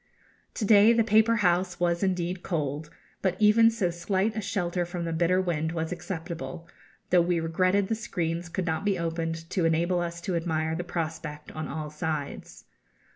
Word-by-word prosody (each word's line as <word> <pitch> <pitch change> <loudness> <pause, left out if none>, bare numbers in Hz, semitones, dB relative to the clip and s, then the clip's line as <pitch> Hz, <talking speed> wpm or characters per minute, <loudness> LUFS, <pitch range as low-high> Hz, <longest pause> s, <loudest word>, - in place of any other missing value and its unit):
To 215 - -1
day 210 +2 +7
the 230 -1 +3
paper 220 +2 +4
house 180 0 +1
was 170 -1 +1
indeed 180 -2 -1
cold; 150 -3 -3 0.3
but 185 -2 +1
even 215 +2 +6
so 215 -6 0
slight 190 +5 -1
a 220 - -2
shelter 180 -3 -1
from 175 0 -4
the 165 - -2
bitter 175 +3 +2
wind 165 -3 -1
was 160 0 -2
acceptable, 170 -1 -6 0.4
though 180 -1 +6
we 170 0 +1
regretted 185 +4 +1
the 225 - 0
screens 175 -6 -3
could 180 +1 -2
not 160 +1 -1
be 200 -2 +1
opened 165 -1 -3
to 185 - 0
enable 170 +2 +2
us 170 0 -3
to 185 -1 -2
admire 160 -1 -1
the 170 +2 -2
prospect 160 -3 -5
on 155 0 -5
all 150 +1 -5
sides. 150 -2 -5
175 Hz, 180 wpm, -27 LUFS, 165-190 Hz, 0.4 s, day